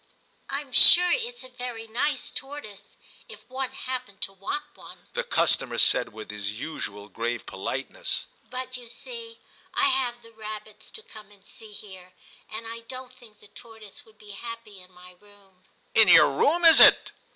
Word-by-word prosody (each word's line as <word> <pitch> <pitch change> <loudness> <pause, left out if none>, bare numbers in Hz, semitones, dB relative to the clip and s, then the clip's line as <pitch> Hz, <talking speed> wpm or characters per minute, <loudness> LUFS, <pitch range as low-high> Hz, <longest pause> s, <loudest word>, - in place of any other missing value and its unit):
* - - -39
Tm 280 -2 -5
sure 355 +7 +8
it's 485 0 -3
a 255 - -12
very 245 -2 -7
nice 255 +5 -2
tortoise, 270 -8 -8 0.3
if - - -13
one 260 0 -4
happened 255 -6 -6
to 195 - -3
want 195 +10 -4
one,' - - -14
the - - -1
customer - - 0
said, - - +3
with 110 0 -9
his 105 +1 -5
usual 105 -10 -6
grave 115 +3 -4
politeness; 135 - -4
* - - -34
but 255 0 -6
you 245 -1 -13
see 460 - -10 0.4
I 370 - +3
have 245 -10 -1
the 230 - -16
rabbits 215 -1 -9
to 440 - -8
come 215 - -14
and 200 -1 -22
see 220 -2 -13
here, 190 -3 -12 0.4
and 225 +1 -7
I 230 +1 -7
don 255 +2 -9
t 255 - -21
think 225 -5 -19
the 210 - -17
tortoise 220 -4 -13
would 220 -1 -23
be 210 -1 -14
happy 230 -3 -9
in 180 +1 -18
my 180 0 -16
room 200 -3 -23
' - - -39
* - - -39
In 220 -2 +7
yer 180 - +8
room, 315 - +2
is 325 - +9
it - - +8
225 Hz, 190 wpm, -26 LUFS, 195-260 Hz, 0.4 s, is